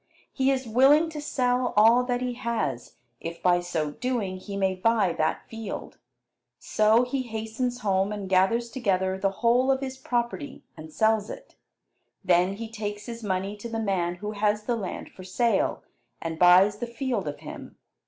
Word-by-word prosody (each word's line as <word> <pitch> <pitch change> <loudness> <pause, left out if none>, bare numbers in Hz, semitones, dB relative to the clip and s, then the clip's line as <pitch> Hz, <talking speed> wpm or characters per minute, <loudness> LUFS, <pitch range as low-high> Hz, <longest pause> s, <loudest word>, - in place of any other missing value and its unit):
He 265 -1 +1
is 265 -1 0
willing 280 +8 +5
to 300 -1 -6
sell 250 -3 0
all 230 +4 +6
that 245 -1 -1
he 250 -1 -2
has 230 - -3 0.2
if 170 +1 -6
by 175 -1 +4
so 165 -4 -2
doing 225 -2 -2
he 200 +1 -7
may 190 -1 +1
buy 200 -1 +2
that 155 - -1
field. 225 -1 -7 0.6
So 215 +3 +3
he 260 +2 -2
hastens 240 +1 -4
home, 195 -1 +1
and 205 -2 -5
gathers 195 +6 +2
together 190 -7 0
the 195 - +2 0.2
whole 250 +3 +4
of 265 - +1
his 265 -1 -6
property 245 +3 -3
and 155 0 -10
sells 220 +2 +1
it. - - -10 0.7
Then 180 +1 +3
he 225 +3 -6
takes 210 -1 -5
his 235 -1 -7
money 195 0 -2
to 235 +3 -7
the 225 - -3
man 185 -5 0
who 210 +4 -5
has 210 0 0
the 240 +2 0
land 200 -5 -6
for 185 - -12
sale, 230 +5 0 0.4
and 165 -1 -5
buys 185 +4 +6
the 240 - -3
field 235 - -3
of 145 - -5
him. - - -9
220 Hz, 175 wpm, -26 LUFS, 190-245 Hz, 0.7 s, all